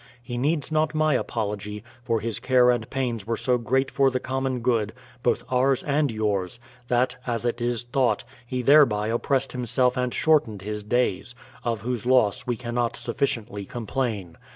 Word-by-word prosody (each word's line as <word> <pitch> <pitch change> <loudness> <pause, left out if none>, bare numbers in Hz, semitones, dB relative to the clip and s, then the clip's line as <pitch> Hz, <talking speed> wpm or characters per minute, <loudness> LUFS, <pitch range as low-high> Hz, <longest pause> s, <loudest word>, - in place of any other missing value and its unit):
He 120 0 -6
needs 145 +5 0
not 155 0 +1
my 155 -1 +3
apology; 105 -2 -3 0.2
for 115 -2 0
his 115 -1 -3
care 125 -1 +4
and 115 -2 -2
pains 120 -6 -2
were 115 -1 -1
so 125 -1 +1
great 130 +4 0
for 135 -1 +3
the 130 -1 -1
common 130 -1 -2
good, 115 -3 +1 0.3
both 120 - +1
ours 130 +1 +2
and 145 0 +1
yours, 105 -1 -1 0.3
thaf, 125 +1 +2
as 120 -1 -2
it 120 0 -1
is 120 -1 0
thought, 125 +1 +1 0.2
he 125 +1 -3
thereby 120 -7 +5
oppressed 135 +3 0
himself 125 0 +1
and 125 -1 0
shortened 120 -12 +2
his 105 +1 -4
days; 120 +1 0 0.3
of 115 -3 -1
whose 120 0 -3
loss 125 -6 +3
we 120 -2 0
cannot 120 0 -2
sufficiently 115 -5 -2
complain. 110 -5 -3
120 Hz, 170 wpm, -25 LUFS, 110-130 Hz, 0.3 s, thereby